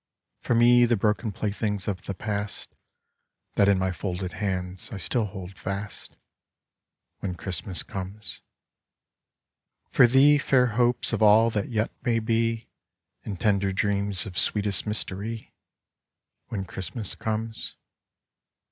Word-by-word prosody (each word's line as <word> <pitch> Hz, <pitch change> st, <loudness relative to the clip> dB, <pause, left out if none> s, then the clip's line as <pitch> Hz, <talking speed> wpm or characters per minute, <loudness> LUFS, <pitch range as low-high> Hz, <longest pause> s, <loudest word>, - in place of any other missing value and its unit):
For 120 Hz, -, 0 dB
me, 120 Hz, +1 st, +6 dB
the 120 Hz, 0 st, +3 dB
broken 105 Hz, +2 st, 0 dB
playthings 105 Hz, 0 st, -2 dB
of 95 Hz, -4 st, -2 dB
the 100 Hz, -, -3 dB
past 105 Hz, +1 st, -4 dB, 0.8 s
That 100 Hz, -, +4 dB
in 100 Hz, -, +4 dB
my 95 Hz, 0 st, 0 dB
folded 90 Hz, +1 st, -4 dB
hands 95 Hz, -2 st, -3 dB
I 105 Hz, -, -5 dB
still 110 Hz, +5 st, 0 dB
hold 95 Hz, -2 st, -8 dB
fast, 100 Hz, +2 st, -5 dB, 1.0 s
When 90 Hz, -3 st, -3 dB
Christmas 90 Hz, 0 st, -3 dB
comes. 100 Hz, +2 st, -6 dB, 1.5 s
For 125 Hz, -, +7 dB
thee, 140 Hz, +4 st, +6 dB
fair 130 Hz, -2 st, +3 dB
hopes 120 Hz, +1 st, +3 dB
of -, -, -1 dB
all 110 Hz, +2 st, +6 dB
that 105 Hz, -2 st, -2 dB
yet 110 Hz, -2 st, 0 dB
may 120 Hz, -2 st, +2 dB
be, 115 Hz, 0 st, 0 dB, 0.6 s
And 100 Hz, -4 st, -5 dB
tender 100 Hz, -3 st, +2 dB
dreams 100 Hz, 0 st, 0 dB
of 90 Hz, -4 st, -3 dB
sweetest 105 Hz, 0 st, 0 dB
mystery, 105 Hz, +1 st, -4 dB, 0.9 s
When 95 Hz, -3 st, -4 dB
Christmas 95 Hz, +3 st, -2 dB
comes. 110 Hz, 0 st, -3 dB
105 Hz, 125 wpm, -26 LUFS, 95-115 Hz, 1.5 s, For